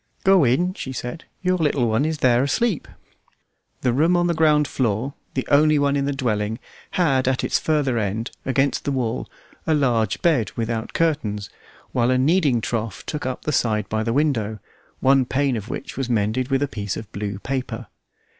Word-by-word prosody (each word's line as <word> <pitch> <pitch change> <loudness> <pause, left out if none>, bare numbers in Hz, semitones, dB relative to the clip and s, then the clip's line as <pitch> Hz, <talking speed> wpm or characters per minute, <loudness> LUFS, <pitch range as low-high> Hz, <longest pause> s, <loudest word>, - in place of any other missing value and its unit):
"Go 190 -3 +5
in," 140 +9 +2
she 130 - -6
said; 125 +6 -6 0.2
"your 185 0 +2
little 145 -6 +2
one 110 +6 +1
is 160 0 -1
there 120 -1 +5
asleep." 170 - 0 0.9
The 125 -2 +1
room 165 +7 +3
on 175 - +2
the 175 - +2
ground 150 -2 +3
floor, 125 +1 -1 0.2
the 130 - -2
only 150 +1 +5
one 140 0 +2
in 140 -1 0
the 140 - 0
dwelling, 110 -5 -1 0.4
had 135 -8 +2
at 130 0 +1
its - - +1
farther 145 -6 +1
end, 110 +3 -2
against 135 +1 +1
the 140 - -1
wall, 125 -3 -2 0.4
a 160 - +3
large 120 -8 +1
bed 150 -11 +2
without 115 -1 -3
curtains, 110 -12 -1 0.4
while 120 0 +2
a 130 - +3
kneading 140 -3 +3
trough 110 0 -3
took 150 -4 -3
up 130 - -4
the 150 - -1
side 110 -6 +1
by 110 0 0
the 115 +1 -1
window, 115 -6 +1 0.4
one 135 0 +5
pane 130 +1 0
of 110 0 -5
which 135 - -6
was 135 -2 -2
mended 115 +2 +1
with 135 +1 +1
a - - 0
piece 100 -6 -4
of 110 -1 -8
blue 100 -1 -4
paper. 125 0 -4
130 Hz, 190 wpm, -22 LUFS, 115-145 Hz, 0.9 s, Go